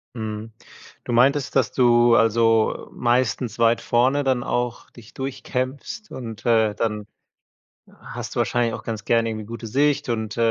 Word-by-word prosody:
Mhm. 110 Hz, -1 st, -5 dB, 0.5 s
Du -, -, -5 dB
meintest, 135 Hz, +4 st, +2 dB
dass 130 Hz, -6 st, +2 dB
du, 120 Hz, -1 st, +4 dB
also, 115 Hz, 0 st, +2 dB
meistens 120 Hz, -1 st, 0 dB
weit 115 Hz, 0 st, +3 dB
vorne 130 Hz, +4 st, +2 dB
dann 130 Hz, -2 st, 0 dB
auch 120 Hz, -2 st, -3 dB
dich 115 Hz, -2 st, -16 dB
durchkämpfst 135 Hz, -, -5 dB
und, 115 Hz, -4 st, -8 dB
äh, 110 Hz, -3 st, +3 dB
dann 105 Hz, -2 st, -2 dB, 0.9 s
hast -, -, -7 dB
du -, -, -4 dB
wahrscheinlich 120 Hz, -2 st, 0 dB
auch 110 Hz, -, -7 dB
ganz 110 Hz, -3 st, -5 dB
gerne 115 Hz, 0 st, +2 dB
irgendwie 110 Hz, -2 st, -5 dB
gute 115 Hz, +1 st, -7 dB
Sicht, 140 Hz, +6 st, +1 dB
äh, -, -, +1 dB
und 110 Hz, -2 st, -4 dB
120 Hz, 155 wpm, -23 LUFS, 110-130 Hz, 0.9 s, du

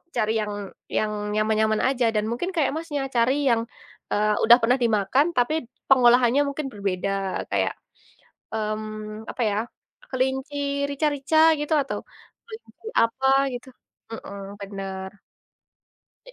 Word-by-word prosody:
cari 215 Hz, +1 st, +1 dB
yang 210 Hz, -1 st, -2 dB, 0.3 s
yang 215 Hz, 0 st, -1 dB, 0.2 s
nyaman-nyaman 215 Hz, 0 st, +2 dB
aja 255 Hz, -3 st, +1 dB
dan 210 Hz, -, +2 dB
mungkin 350 Hz, +10 st, -2 dB
kayak 305 Hz, -4 st, +2 dB
Masnya, 315 Hz, -3 st, -3 dB
cari 235 Hz, +2 st, +4 dB, 0.2 s
yang, 230 Hz, -1 st, +3 dB, 0.5 s
eee, 210 Hz, 0 st, +2 dB
udah 235 Hz, +1 st, +8 dB
pernah 245 Hz, +3 st, +3 dB
dimakan 225 Hz, +5 st, +3 dB
tapi 245 Hz, +5 st, +2 dB, 0.4 s
pengolahannya 245 Hz, +1 st, +6 dB
mungkin 280 Hz, 0 st, -3 dB
berbeda 195 Hz, -2 st, -2 dB, 0.4 s
kayak, -, -, +1 dB, 0.8 s
mmm, 215 Hz, 0 st, -4 dB
apa 250 Hz, -, -5 dB
ya, 200 Hz, -, -1 dB, 0.5 s
kelinci 265 Hz, +2 st, -1 dB, 0.3 s
rica-rica 285 Hz, +1 st, 0 dB, 0.2 s
gitu, 295 Hz, +2 st, -1 dB
atau 275 Hz, -, -4 dB, 0.4 s
kelinci 450 Hz, -1 st, -12 dB, 0.2 s
apa 265 Hz, +4 st, 0 dB, 0.3 s
gitu, 245 Hz, -, -9 dB, 0.4 s
mhm, 200 Hz, -2 st, -8 dB
bener. 195 Hz, -1 st, -6 dB, 1.2 s
I -, -, -13 dB
235 Hz, 120 wpm, -24 LUFS, 215-270 Hz, 1.2 s, udah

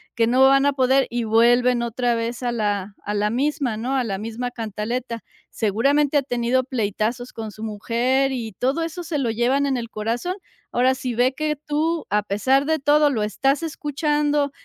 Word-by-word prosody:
que 230 Hz, -, +3 dB
no 250 Hz, +3 st, +3 dB
van 275 Hz, +1 st, +4 dB
a 285 Hz, -, +3 dB
poder 265 Hz, 0 st, +3 dB
y 240 Hz, -1 st, -2 dB
vuelven 240 Hz, +2 st, +4 dB
otra 240 Hz, +1 st, 0 dB
vez 230 Hz, +1 st, -3 dB
a 245 Hz, -1 st, -1 dB
la 205 Hz, -3 st, -2 dB
a 205 Hz, -, -3 dB
la 210 Hz, 0 st, +1 dB
misma, 265 Hz, -1 st, -1 dB
¿no?, 250 Hz, +5 st, -2 dB
a 260 Hz, -, +1 dB
la 200 Hz, -5 st, -3 dB
misma 230 Hz, +4 st, -4 dB
cantaleta. 230 Hz, +1 st, -4 dB, 0.3 s
Seguramente 275 Hz, +8 st, +1 dB
ha -, -, +4 dB
tenido 245 Hz, 0 st, 0 dB
pleitazos 240 Hz, 0 st, -2 dB
con 220 Hz, -2 st, -6 dB
su 215 Hz, +2 st, -10 dB
mujer 240 Hz, +5 st, 0 dB
y 230 Hz, -5 st, -4 dB
todo 265 Hz, +10 st, -1 dB
eso 330 Hz, +2 st, -5 dB
se 320 Hz, -2 st, -3 dB
lo 250 Hz, -4 st, 0 dB
llevan 245 Hz, +5 st, +1 dB
en 270 Hz, -2 st, 0 dB
el 230 Hz, -1 st, -5 dB
corazón. 230 Hz, +12 st, -2 dB, 0.4 s
Ahora, 255 Hz, +2 st, +3 dB
si 255 Hz, -2 st, -4 dB
ve 250 Hz, +3 st, +2 dB
que 305 Hz, +2 st, -1 dB
tú, 315 Hz, +2 st, 0 dB
a 210 Hz, 0 st, +1 dB
pesar 260 Hz, +8 st, +1 dB
de 315 Hz, +1 st, +1 dB
todo, 295 Hz, +1 st, +4 dB
lo 230 Hz, -7 st, -1 dB
estás 270 Hz, +8 st, 0 dB
escuchando 295 Hz, -2 st, 0 dB
245 Hz, 195 wpm, -22 LUFS, 225-275 Hz, 0.4 s, van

